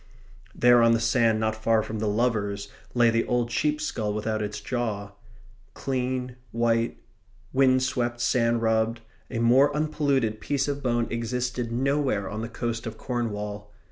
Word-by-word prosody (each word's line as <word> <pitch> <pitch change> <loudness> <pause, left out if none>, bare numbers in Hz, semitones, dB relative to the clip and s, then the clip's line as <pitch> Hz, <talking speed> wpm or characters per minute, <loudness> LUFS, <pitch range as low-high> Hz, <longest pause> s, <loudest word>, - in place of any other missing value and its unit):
There 120 0 +6
on 115 0 +5
the 115 - +2
sand 115 -1 +2
not 110 0 0
far 110 0 +2
from 110 0 -5
the 110 - -1
lovers 105 -2 0 0.3
lay 120 -1 +5
the 115 0 +2
old 120 -1 0
sheep's 150 +5 0
skull 105 -7 -2
without 110 0 -1
its 105 0 -3
jaw. 105 -3 -3 0.6
Clean, 125 -1 -2
white, 115 0 +1 0.6
wind 130 -1 +4
swept, 120 -2 -1
sand 115 -1 +2
rubbed, 110 +1 +1 0.3
a 120 - -4
more 125 +5 +5
unpolluted 140 -8 0
piece 140 -1 0
of 145 0 -2
bone 120 -2 +1
existed 120 +1 -2
nowhere 130 -4 0
on 110 +2 -4
the 115 - -4
coast 115 -1 -3
of 110 -1 -6
Cornwall. 105 -4 -4
115 Hz, 155 wpm, -26 LUFS, 110-125 Hz, 0.6 s, There